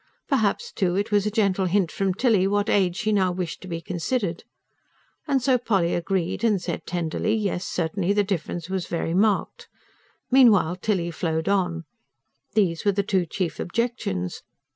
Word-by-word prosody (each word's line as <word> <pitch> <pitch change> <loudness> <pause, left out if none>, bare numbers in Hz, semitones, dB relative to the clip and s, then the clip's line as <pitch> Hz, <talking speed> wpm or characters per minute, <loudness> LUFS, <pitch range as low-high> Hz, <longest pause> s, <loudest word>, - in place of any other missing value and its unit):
Perhaps, 275 - 0
too, 180 - 0
it 205 +3 -1
was 205 0 +2
a - - +2
gentle 200 -3 +1
hint 180 -2 +1
from 195 -2 -1
Tilly 210 -5 +3
what 205 +1 +1
age 185 -3 +2
she 215 - 0
now 190 -3 +2
wished 180 -2 -4
to 185 - -9
be 165 -2 -4
considered. 180 +1 -2 0.8
And 270 -4 +1
so 255 -1 +3
Polly 195 -8 +1
agreed, 175 +3 -1
and 215 -4 +3
said 180 - -5
tenderly: 175 +5 -1
yes, 200 -4 -2
certainly, 175 +3 -1
the 205 0 +3
difference 175 -3 -3
was 190 -2 -3
very 165 -1 -2
marked. 200 +2 +1 0.6
Meanwhile 215 -10 +5
Tilly 180 -4 -1
flowed 160 -1 -2
on. 180 -4 0 0.7
These 180 -6 +2
were 205 - +3
the 200 +1 0
two 190 -3 0
chief 165 -2 -3
objections. 175 - -2
190 Hz, 165 wpm, -24 LUFS, 175-210 Hz, 0.8 s, Meanwhile